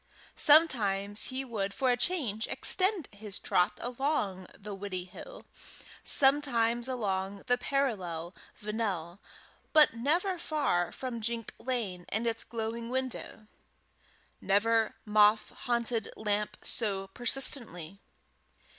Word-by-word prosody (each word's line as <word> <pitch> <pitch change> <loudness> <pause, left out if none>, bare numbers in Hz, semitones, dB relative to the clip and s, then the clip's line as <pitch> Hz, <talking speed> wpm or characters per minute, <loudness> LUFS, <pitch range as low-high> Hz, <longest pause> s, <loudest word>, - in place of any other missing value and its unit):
Sometimes 215 -11 +5
he 265 +1 -3
would 200 -5 -3
for 260 -2 +2
a - - +3
change 245 - -1
extend 375 - +1
his 205 -1 -7
trot 180 - +2
along 240 - -2
the 205 -1 -7
Widdiehill, 195 - -7 0.6
sometimes 245 -4 +3
along 200 -5 -2
the 245 0 +2
parallel 190 -12 -2 0.3
Vennel, 200 -5 -3 0.5
but 305 -5 +7
never 335 - 0
far 280 - 0
from 250 -3 -5
Jink 230 0 -3
Lane 220 -8 -3
and 220 +3 -1
its 230 -1 -1
glowing 230 0 -4
window. 255 -3 -4 1.0
Never 220 +3 +2
moth 210 0 +4
haunted 235 -2 -1
lamp 210 -1 -1
so 200 -4 0
persistently. 210 - -2
225 Hz, 105 wpm, -30 LUFS, 200-260 Hz, 1.0 s, but